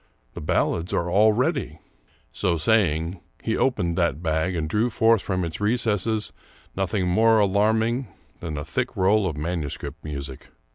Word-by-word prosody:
The - - -7
ballads 85 +3 0
are 85 0 -1
all 105 +4 +5
ready! 125 - -1 0.3
" - - -36
So 85 -2 0
saying, 85 -2 +1 0.2
he 110 - 0
opened 95 -10 0
that 85 -2 0
bag 80 +2 0
and 80 -2 -2
drew 110 +8 +1
forth 115 -2 +3
from 90 -2 -2
its 85 +4 -6
recesses 110 -1 0 0.4
nothing 95 0 -1
more 110 +5 +4
alarming 110 +5 +2 0.3
than 80 -3 -5
a 75 - -4
thick 125 +8 -3
roll 100 +1 +3
of 80 -5 -4
manu 80 -1 -2
script - - -7
music. 70 -3 -7
95 Hz, 160 wpm, -24 LUFS, 80-110 Hz, 0.4 s, all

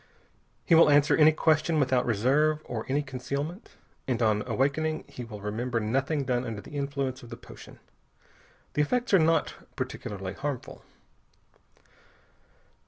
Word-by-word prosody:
He 170 - +3
will 165 -1 +7
answer 145 0 +5
any 155 0 +6
question 155 0 +2
without 130 -3 +2
reserve 140 +8 +2
or 110 -2 -5
any 145 +2 +1
concealment. 140 - -5 0.3
And 125 -3 0
on 105 -1 +2
awakening 155 +4 0
he 125 - -8
will 110 -3 -9
remember 115 +4 -2
nothing 135 +7 0
done 125 -2 0
under 115 -4 -5
the - - -12
influence 140 -2 -3
of 120 - -12
the - - -8
potion. - - -13 1.0
The 150 - +1
effects 245 +10 0
are 195 - +7
not 160 0 +2 0.2
particularly 95 -2 -5
harmful. 140 +4 -5
135 Hz, 140 wpm, -28 LUFS, 120-155 Hz, 1.0 s, will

